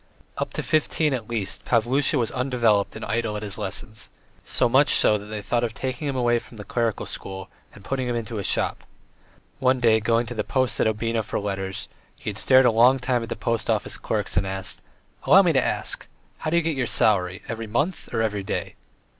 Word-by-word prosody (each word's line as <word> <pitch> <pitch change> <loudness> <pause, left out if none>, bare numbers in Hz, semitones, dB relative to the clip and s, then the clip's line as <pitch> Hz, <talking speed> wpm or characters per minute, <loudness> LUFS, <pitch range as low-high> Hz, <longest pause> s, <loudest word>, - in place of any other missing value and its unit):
Up - - -2
to - - -3
fifteen 155 -1 +1
at 120 -4 -4
least 110 -5 -3
Pavlusha 130 +5 +2
was 115 -3 0
undeveloped 120 -6 +1
and - - -6
idle 110 0 -1
at 105 - -6
his 105 0 -5
lessons, 105 +2 -4 0.3
so - - +1
much 135 +5 +4
so 105 - +4
that 100 - -10
they 105 -1 -5
thought 120 +2 0
of 115 -2 -2
taking 130 +2 -3
him 140 - -2
away 120 -2 +2
from 115 - -15
the 105 - -7
clerical 115 +1 -1
school 95 0 -6 0.2
and - - -15
putting 130 -2 -2
him 120 - -1
into 115 -1 -4
a - - -3
shop; - - 0 0.8
one 130 0 +3
day, 115 -2 +4
going 115 +2 +1
to 120 - -6
the 110 -2 -2
post 130 -1 0
at - - +3
Obnino 115 +1 0
for - - -3
letters, 95 -1 -4 0.3
he - - -5
had 100 - -7
stared 130 +3 +5
a 120 - +5
long 120 +4 +5
time 125 -1 0
at 115 - -6
the - - -3
post 115 -1 -2
office - - 0
clerks - - -2
and 95 +1 +2
asked: 95 0 -4 0.4
"Allow 195 +1 +7
me 170 -3 +3
to 130 - +3
ask, - - -1 0.3
how - - -2
do 170 - +2
you 170 - +2
get 160 -1 0
your 130 -3 -1
salary, 95 -5 +2
every 115 -1 -5
month 145 - -2
or 115 -1 0
every 105 -2 -1
day?" 95 - -4
115 Hz, 220 wpm, -24 LUFS, 105-130 Hz, 0.8 s, Allow